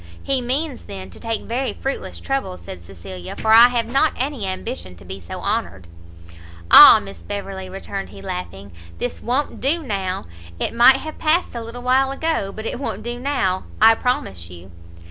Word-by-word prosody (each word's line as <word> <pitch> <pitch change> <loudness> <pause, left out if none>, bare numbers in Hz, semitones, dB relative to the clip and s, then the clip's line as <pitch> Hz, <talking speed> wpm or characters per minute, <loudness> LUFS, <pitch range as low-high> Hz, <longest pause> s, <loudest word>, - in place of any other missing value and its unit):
"He 270 -2 0
means, 265 +3 -3
then, 190 -2 -9
to - - -11
take 225 -1 -3
very 255 +3 -2
fruitless 270 - -5
trouble," 265 -10 -3
said 90 -2 -10
Cecilia, 90 0 -9
"for 220 - 0
I 230 +2 +9
have 240 -2 -1
not 270 +6 +2
any 260 -6 -2
ambition 90 - -5
to 85 0 -16
be 95 +2 -7
so 85 - -8
honoured." 90 -3 -2 0.9
"Ah, - - +11
Miss 100 -3 -10
Beverley," 190 - -6
returned 195 +1 -6
he, - - -12
laughing, 180 - -7 0.3
"this 245 - -4
won't 260 +5 -1
do 315 +5 +1
now! 195 -6 -3 0.3
it - - -2
might 240 +3 +7
have 310 +3 -8
passed 325 +3 +1
a 235 - -5
little 235 +2 -9
while 260 +2 +3
ago, 275 -8 -1
but 220 +2 -8
it 240 - -3
won't 215 -6 -4
do 240 +1 -5
now, 200 -9 -1
I 225 +1 +8
promise 95 - -2
you!" 90 +1 -13
220 Hz, 185 wpm, -21 LUFS, 180-260 Hz, 0.9 s, Ah